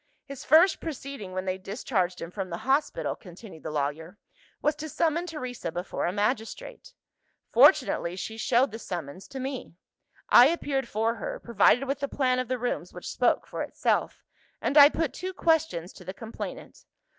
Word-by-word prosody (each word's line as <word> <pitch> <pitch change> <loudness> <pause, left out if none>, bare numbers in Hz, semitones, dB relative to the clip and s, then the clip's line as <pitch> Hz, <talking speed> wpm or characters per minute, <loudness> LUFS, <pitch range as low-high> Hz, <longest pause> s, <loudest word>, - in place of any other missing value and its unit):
"His 275 -2 -8
first 330 +6 +5
proceeding 275 - -6
when 185 0 -3
they 185 0 -2
discharged 190 -3 -2
him 165 - -7
from 190 -1 -5
the 170 - -4
hospital," 280 +2 +1
continued 180 -3 -12
the - - -5
lawyer, 155 +5 -3 0.4
"was 300 - +2
to 310 +1 -6
summon 335 +3 0
Teresa 255 - -5
before 175 +1 -3
a - - 0
magistrate. 225 - -3 0.6
Fortunately 255 - +4
she 195 +4 -5
showed 240 +3 +2
the 225 - -7
summons 175 -3 -6
to 270 - -7
me. 260 -8 -5 0.5
I 245 - +8
appeared 280 -5 -1
for 225 +1 0
her, - - -5
provided 235 +3 +3
with 275 +1 -2
a 280 - 0
plan 255 -2 +1
of 255 - -2
the 255 - -1
rooms 245 0 -3
which - - -8
spoke - - +2
for - - -6
itself; - - -1 0.4
and - - -1
I 290 -1 +10
put 320 -1 -2
two 375 +1 -5
questions 320 - +1
to - - -13
the 185 +2 -7
complainant. 225 -1 -8
245 Hz, 175 wpm, -27 LUFS, 185-280 Hz, 0.6 s, I